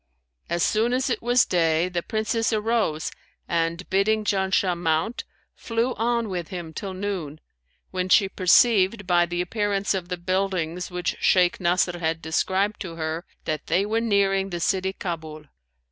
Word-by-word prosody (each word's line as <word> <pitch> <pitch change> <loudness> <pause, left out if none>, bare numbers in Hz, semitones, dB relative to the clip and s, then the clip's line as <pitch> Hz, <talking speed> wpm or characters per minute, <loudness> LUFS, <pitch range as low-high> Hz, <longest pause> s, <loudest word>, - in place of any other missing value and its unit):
As 170 0 0
soon 225 +3 +2
as 255 +1 0
it - - -1
was 245 +1 +4
day, 165 -1 +2
the 180 -1 -2
Princess 220 +4 -1
arose 215 -7 0 0.4
and, 170 +1 -1
bidding 215 +3 +2
Janshah 190 -2 +1
mount, 170 +7 -1 0.3
flew 235 +2 -1
on 235 0 0
with 180 -4 -4
him 175 -4 -7
till 190 +3 -5
noon, 185 -7 -4 0.5
when 185 0 -2
she 195 +1 +5
perceived 195 +2 +3
by 175 -1 +3
the 175 +1 -2
appearance 200 +1 0
of 180 -2 -4
the 180 - -2
buildings 180 -1 -1
which 180 -1 -3
Shaykh 180 -2 +3
Nasr 175 0 +1
had 165 -1 -1
described 190 +6 0
to 175 -5 -6
her, 160 +1 -4 0.2
that 155 -1 -3
they 195 +3 +2
were 220 +2 0
nearing 195 -3 +2
the 175 -2 -4
city 190 +2 0
Kabul. 160 -5 -6
185 Hz, 160 wpm, -24 LUFS, 170-205 Hz, 0.5 s, she